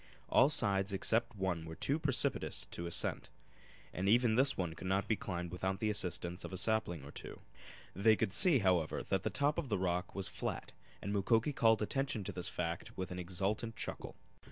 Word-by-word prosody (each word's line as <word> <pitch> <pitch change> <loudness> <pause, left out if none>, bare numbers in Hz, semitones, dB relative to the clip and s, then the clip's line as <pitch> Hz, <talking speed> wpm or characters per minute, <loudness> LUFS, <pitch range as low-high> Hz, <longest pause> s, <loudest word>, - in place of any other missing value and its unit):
All 130 - +5
sides 100 -8 +3
except 110 +4 +1
one 95 -4 -2
were 80 0 -8
too 140 - -1
precipitous 145 -5 0
for 85 - -5
ascent, 85 - -1 0.6
and 95 +2 -1
even 120 +1 +4
this 135 +4 +3
one 90 -3 -2
could 85 +3 -8
not 95 +2 0
be 110 - +2
climbed 90 -4 -5
without 95 +1 -2
the 110 -1 0
assistance 90 -2 -2
of - - -7
a 95 - -4
sapling 95 -7 0
or 70 - -10
two. - - -9 0.6
They 110 +4 +4
could 95 - -1
see, 180 -7 +7
however, 90 -4 +1
that - - -1
the - - -1
top 145 +1 0
of 135 - -5
the, 105 - +1
rock 90 0 -2
was 95 -1 -2
flat, - - -5 0.3
and 100 - -3
Mukoki 115 +7 +2
called 110 -3 +3
attention 135 -2 -1
to - - -4
this 90 -1 -4
fact 85 +1 -4
with 95 -1 -4
an 90 - -5
exultant 100 +6 -2
chuckle. - - -6
95 Hz, 200 wpm, -34 LUFS, 90-115 Hz, 0.6 s, see